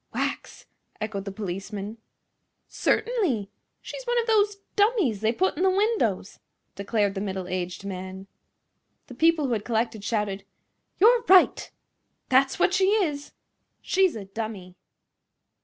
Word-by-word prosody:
"Wax!" - - -4 0.3
echoed 200 -2 -4
the 200 - -4
policeman. 200 +2 -6 0.7
"Certainly. 375 - 0 0.3
She's - - -7
one 485 0 +1
of 465 - 0
those 420 -2 +3 0.2
dummies 405 - +2
they 220 0 +2
put 370 +10 0
in 315 - -4
the 380 - +4
windows," 375 - 0 0.3
declared 200 0 0
the 195 - -4
middle 190 -2 -4
aged 180 +1 -4
man. 190 0 -6 0.8
The - - -11
people 320 +3 +3
who 250 - 0
had 210 -2 -2
collected 225 -2 -1
shouted: 205 -3 -2 0.5
"You're 465 +5 +6
right!" 375 -1 +5 0.6
"That's 265 +1 +3
what 360 - +2
she 380 0 +3
is!" 350 -9 0 0.5
"She's 380 -5 +2
a 210 -3 -6
dummy!" 195 -3 -6
230 Hz, 135 wpm, -26 LUFS, -, 0.8 s, You're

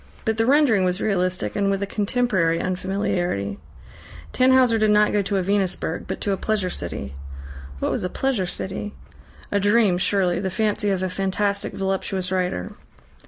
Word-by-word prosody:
But 220 -1 0
the 225 +1 +1
rendering 270 -8 +4
was 180 +1 0
realistic, 185 -3 -1
and 200 -1 +1
with 195 0 0
a - - 0
contemporary 200 -5 0
unfamiliarity. 180 - -2 0.7
Tannhauser 255 -3 +4
did 215 0 +3
not 210 0 +4
go 205 - +3
to 200 0 -1
a 190 - 0
Venusberg, 190 -4 -1
but - - -4
to 205 - 0
a 195 - 0
Pleasure 205 -4 -1
City. 85 - -5 0.6
What - - -1
was - - 0
a 180 - -1
Pleasure 245 -8 -1
City? 190 +3 -4 0.6
A 205 - +2
dream, 205 -2 +3
surely, 185 -3 +1
the 190 - -2
fancy 210 +1 0
of 190 -1 0
a - - +1
fantastic, 200 +2 -1
voluptuous 190 -1 -2
writer. 180 - -1
195 Hz, 165 wpm, -23 LUFS, 185-210 Hz, 0.7 s, rendering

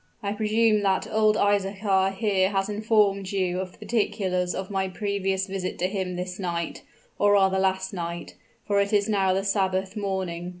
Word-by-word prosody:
"I 200 - -1
presume 215 0 +2
that 195 -2 +1
old 215 -1 +3
Isaachar 195 -1 +1
here 190 -3 +2
has 195 0 -1
informed 210 -2 +2
you 185 -2 0
of 185 -1 -4
the - - -20
particulars 195 -5 -1
of 190 +1 -5
my 190 -1 0
previous 195 0 -1
visit 190 -1 -4
to 175 - 0
him 190 -2 -3
this 180 +1 -5
night 170 -2 -3 0.4
or 205 0 +4
rather 190 -1 +4
last 190 0 0
night, 170 -1 -5 0.3
for 200 -1 +2
it 200 +1 -1
is 205 0 +3
now 195 -3 +2
the 190 +1 0
Sabbath 190 -1 0
morning." 190 -4 -3
195 Hz, 175 wpm, -25 LUFS, 185-205 Hz, 0.4 s, or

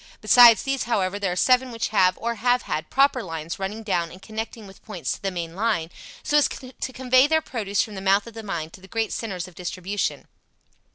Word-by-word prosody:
Besides 230 +1 +7
these, 270 -3 -1
however, 200 -4 0
there 195 -3 -1
are - - -2
seven 255 +6 +3
which 230 -1 -2
have, 185 -4 +3
or 235 +1 -2
have 245 +1 +2
had, 155 0 -4
proper 275 -1 +3
lines 165 -3 -6
running 205 +3 -4
down 175 -5 -1
and 185 - -12
connecting 220 +1 -6
with 195 0 -15
points 195 -7 -4
to - - -5
the 195 - -1
main 170 -2 -5
line, 195 -6 -1 0.3
so 295 - +2
as 290 - +2
to 260 0 -7
convey 255 +1 +3
their 320 +1 +3
produce 215 -10 -1
from 215 - -9
the 190 - -6
mouth 195 +1 +3
of 230 - -11
the 225 - -7
mine 170 -6 -4
to 185 - -14
the 190 - -14
great 225 +2 -2
centres 190 -6 -4
of 185 - -14
distribution. 185 +3 -3
210 Hz, 225 wpm, -24 LUFS, 185-240 Hz, 0.3 s, Besides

